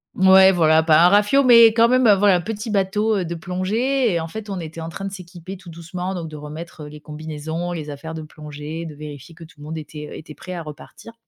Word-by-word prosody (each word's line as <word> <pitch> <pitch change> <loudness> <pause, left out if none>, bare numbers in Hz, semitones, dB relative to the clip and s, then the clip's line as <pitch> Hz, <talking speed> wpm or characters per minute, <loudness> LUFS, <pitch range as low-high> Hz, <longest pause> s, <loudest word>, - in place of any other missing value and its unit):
mouais, 190 0 +7
voilà, 160 -2 +4
pas 160 0 +5
un - - +7
rafiot, 210 +8 +4
mais 235 -2 +8
quand 230 0 +4
même, 255 0 +3
voilà, 200 -2 +4
petit 215 +4 -5
bateau, 210 +2 +1
heu, 180 - -2
de 170 - -4
plongée. 210 +7 -1
Et 170 - 0
en 160 - -4
fait, 215 +2 -8
on 190 - -4
était 165 0 -8
en 165 - -6
train 195 +3 -7
de 195 - -4
s'équiper 180 0 -10
tout 180 -2 -14
doucement, 180 +3 -6
donc 165 -3 -5
de 155 - -10
remettre 155 +1 -9
les 150 0 -11
combinaisons, 160 +2 -6
les 155 -3 -6
affaires 155 +3 -7
de 160 - -6
plongée, 150 +1 -8
de 155 - -8
vérifier 150 +1 -10
que 165 - -13
tout 160 -2 -17
le - - -12
monde 160 +1 -6
était, 150 -1 -8
heu, - - -8
était 155 -1 -11
prêt 185 - -9
à 170 - -5
repartir. 155 +9 -12
170 Hz, 245 wpm, -21 LUFS, 155-195 Hz, -, mais